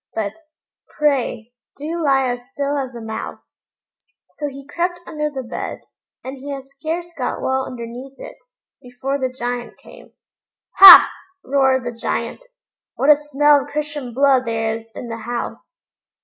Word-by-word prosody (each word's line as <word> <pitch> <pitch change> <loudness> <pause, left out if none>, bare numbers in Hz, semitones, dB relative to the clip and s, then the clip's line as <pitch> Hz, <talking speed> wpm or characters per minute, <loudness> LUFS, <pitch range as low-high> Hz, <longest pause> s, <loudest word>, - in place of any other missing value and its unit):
But, 210 -2 -2 0.6
pray, 260 -6 0 0.2
do 320 +4 -4
lie 270 -2 +3
as 245 0 -6
still 285 0 -1
as 260 -2 -5
a 235 - -7
mouse." 220 0 -8 0.6
So 295 - -5
he 275 -1 -9
crept 350 +4 -2
under 300 -1 -3
the 270 -3 -6
bed, 235 - -6 0.4
and 265 +2 -7
he 280 +2 -8
had 275 -1 -5
scarce 320 +6 -6
got 255 -5 -3
well 265 0 -1
underneath 250 +2 -8
it, - - -10 0.4
before 260 +3 -4
the 260 -1 -1
Giant 245 -1 -5
came. - - -16 0.6
"Ha!" 385 -2 +12 0.4
roared 265 -1 +2
the 240 - -2
Giant, 230 - -3 0.5
"what 280 +3 +4
a - - +8
smell 295 0 +3
of 270 - -9
Christian 290 -3 -4
blood 265 0 +3
there 225 -1 -1
is 225 0 -11
in 245 - -7
the 230 -1 -5
house!" 235 +1 -7
270 Hz, 155 wpm, -20 LUFS, 245-290 Hz, 0.6 s, Ha